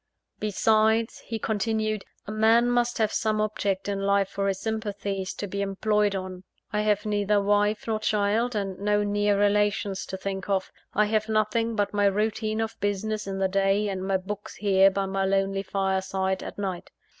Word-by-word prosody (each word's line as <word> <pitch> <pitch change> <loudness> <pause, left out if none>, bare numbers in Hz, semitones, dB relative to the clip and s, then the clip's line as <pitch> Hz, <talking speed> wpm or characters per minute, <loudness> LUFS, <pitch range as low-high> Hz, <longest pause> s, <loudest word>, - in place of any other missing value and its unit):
"Besides," 220 +2 +2
he 225 - -2
continued, 215 -1 -1 0.2
"a 210 - -6
man 225 +3 +4
must 240 0 +1
have 220 -2 +1
some 215 -1 0
object 205 -2 -1
in 200 -1 -1
life 200 0 +2
for 195 0 -2
his 195 -1 -1
sympathies 205 -3 -3
to - - -4
be 200 0 -4
employed 205 +1 +1
on. 185 -1 -5 0.3
I 210 - +1
have 210 0 +1
neither 205 0 +2
wife 205 +1 +1
nor 220 -1 -1
child; 215 +3 +1
and 195 -3 -3
no 205 +1 +2
near 205 0 +1
relations 205 -1 +1
to 190 - -5
think 190 0 -5
of 190 -1 0 0.2
I 210 - +4
have 215 +1 0
nothing 220 +1 +1
but 205 -1 0
my 205 0 +2
routine 215 +2 0
of 225 0 -4
business 205 +1 -2
in 195 0 -3
the 195 0 +2
day, 195 +2 +1
and 190 -1 -3
my 190 0 +1
books 205 +2 -7
here 195 -1 +4
by 195 0 -1
my 195 0 -1
lonely 195 0 +1
fireside, 190 -1 -1
at - - -7
night. 190 -3 -4
205 Hz, 180 wpm, -26 LUFS, 195-215 Hz, 0.3 s, man